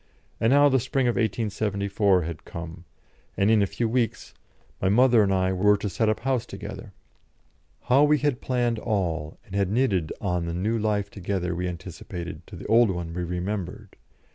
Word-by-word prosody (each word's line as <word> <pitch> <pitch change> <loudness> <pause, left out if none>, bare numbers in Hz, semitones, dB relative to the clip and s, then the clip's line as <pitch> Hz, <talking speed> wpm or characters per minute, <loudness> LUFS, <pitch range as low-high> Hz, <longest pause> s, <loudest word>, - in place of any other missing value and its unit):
And 115 - +2
now 145 +2 +6
the 135 -2 +3
spring 130 +2 0
of 120 - +2
1874 100 -3 0
had 80 -1 -6
come, 85 +1 -8 0.5
and 100 +2 +3
in 110 -2 +5
a 100 - +2
few 115 - -2
weeks 120 0 -1 0.5
my 95 - +2
mother 120 +2 +5
and 100 -2 +2
I 95 0 +1
were 105 +3 +4
to 100 - -3
set 110 +3 +1
up 110 - -1
house 130 -2 0
together. - - -8 0.9
How 135 +3 +4
we 150 0 +4
had 145 -4 -1
planned 120 -3 0
all, 85 -9 -2
and 100 - -14
had 100 -2 +1
knitted 100 -8 +1
on 90 -4 -1
the 85 - -3
new 110 +6 0
life 105 -2 -1
together 90 -2 -2
we 90 +1 -2
anticipated 90 0 -7
to - - -10
the - - -9
old 115 0 +5
one 85 -3 -4
we 90 +1 -3
remembered! 90 +2 -4
100 Hz, 185 wpm, -25 LUFS, 90-115 Hz, 0.9 s, now